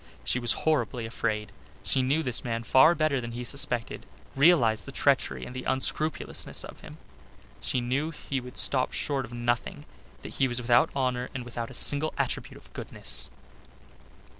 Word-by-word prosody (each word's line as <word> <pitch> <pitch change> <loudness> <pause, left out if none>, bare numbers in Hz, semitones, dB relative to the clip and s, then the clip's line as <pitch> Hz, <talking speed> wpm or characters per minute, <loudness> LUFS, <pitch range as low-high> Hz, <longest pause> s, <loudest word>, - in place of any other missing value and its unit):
She - - +1
was 120 -1 +4
horribly 140 -6 +1
afraid. 110 -2 -2 0.3
She 135 - +2
knew 140 +5 +1
this 125 -4 +1
man 115 -1 -2
far 155 +8 +6
better 155 -4 +1
than 120 -1 -6
he 120 +1 -5
suspected, 120 -2 -2 0.3
realized 135 -7 +4
the - - -6
treachery 65 -1 +1
and 125 - -9
the 130 - -5
unscrupulousness 155 +4 -1
of - - -10
him. - - -12 0.6
She 125 - -1
knew 135 +6 -1
he 140 -4 -4
would 125 0 -9
stop 130 -2 +2
short 135 -3 -1
of 120 - -14
nothing, 120 0 -2 0.4
that - - -8
he 135 - +3
was 120 -1 0
without 120 0 +4
honour 125 -2 -1
and 125 -2 -4
without 120 -1 -5
a 130 - -11
single 145 +4 +3
attribute - - -2
of - - -19
goodness. - - -2
125 Hz, 170 wpm, -28 LUFS, 120-140 Hz, 0.6 s, far